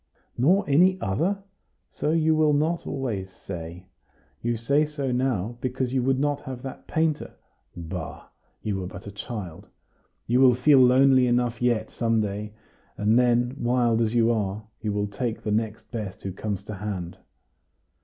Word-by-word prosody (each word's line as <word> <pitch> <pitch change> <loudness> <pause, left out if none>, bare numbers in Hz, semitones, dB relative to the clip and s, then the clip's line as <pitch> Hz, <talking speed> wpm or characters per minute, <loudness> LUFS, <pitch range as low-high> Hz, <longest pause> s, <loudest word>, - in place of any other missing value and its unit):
"Nor 185 - +3
any 180 +6 +4
other? 175 - -1 0.5
So - - -2
you 160 0 +3
will 155 -1 +3
not 160 +4 0
always 110 -9 -3
say! 90 -1 -8 0.6
You 120 0 -1
say 140 +7 +2
so 145 -3 -3
now, 120 -3 -1
because 130 0 -2
you 130 - +2
would 130 +1 +2
not 145 0 +1
have 130 -3 -8
that 135 - -8
painter. 160 -2 -1 0.4
Bah! 85 -1 -6 0.4
you 105 -2 -1
were 90 - -4
but 100 +1 -10
a 100 - -7
child! 100 -5 -7 0.6
You 125 +3 +2
will 125 -2 +7
feel 135 +2 +5
lonely 130 0 +6
enough 120 -1 +1
yet, 120 -3 +1
some 115 -1 +1
day; 105 0 -3 0.5
and 110 +3 +3
then, 120 +1 +2
wild 120 -1 +2
as 115 +1 0
you 115 0 +4
are, 105 -2 -1 0.2
you 105 -1 -1
will 105 0 0
take 110 +3 -4
the 105 - -2
next 110 0 -2
best 105 -6 -5
who 95 - -3
comes 100 +1 -4
to 105 - -7
hand." 95 -4 -5
120 Hz, 165 wpm, -25 LUFS, 105-135 Hz, 0.6 s, will